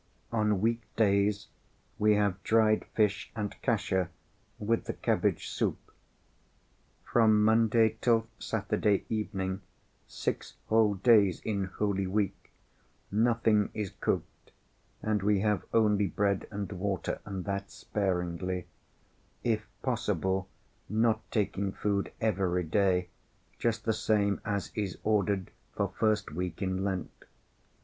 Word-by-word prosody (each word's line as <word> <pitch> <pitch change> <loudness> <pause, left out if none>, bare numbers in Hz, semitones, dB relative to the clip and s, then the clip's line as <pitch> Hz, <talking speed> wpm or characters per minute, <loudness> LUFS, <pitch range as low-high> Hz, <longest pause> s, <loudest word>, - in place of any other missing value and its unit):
On 105 -4 +1
weekdays 105 -3 +1 0.5
we 105 0 +5
have 100 -2 +1
dried 110 -1 +3
fish 105 -2 +1
and 105 -2 -3
kasha 95 -7 +1 0.5
with 115 +2 0
the - - -3
cabbage - - 0
soup. - - 0 1.3
From 110 -3 +4
Monday 110 0 +4
till 115 -2 +3
Saturday 105 -2 0
evening, 95 -3 -2 0.5
six - - -3
whole 110 -2 +4
days 100 -3 +5
in 100 -3 -1
Holy 100 0 -1
Week, 100 0 -2 0.6
nothing 110 -1 +3
is 105 -3 -3
cooked, - - -3 0.5
and 105 -2 +1
we 100 0 +2
have 105 -1 +1
only 105 -3 +3
bread 100 +1 0
and 100 -1 -4
water, 95 0 -2
and 95 -3 -5
that 100 -1 -3
sparingly; 90 -2 -2 0.8
if 110 -2 0 0.2
possible 95 - 0 0.4
not 110 +1 +2
taking 100 -2 0
food 100 0 -1
every 95 -5 +1
day, 90 +1 +1 0.5
just 115 -2 0
the 110 - +2
same 105 -2 +1
as 100 -3 -2
is 100 -4 -3
ordered 100 -3 +1 0.2
for 100 -2 -1
first 105 -5 +1
week 90 +1 -4
in 95 0 -1
Lent. 95 -4 -4
105 Hz, 115 wpm, -30 LUFS, 95-110 Hz, 1.3 s, we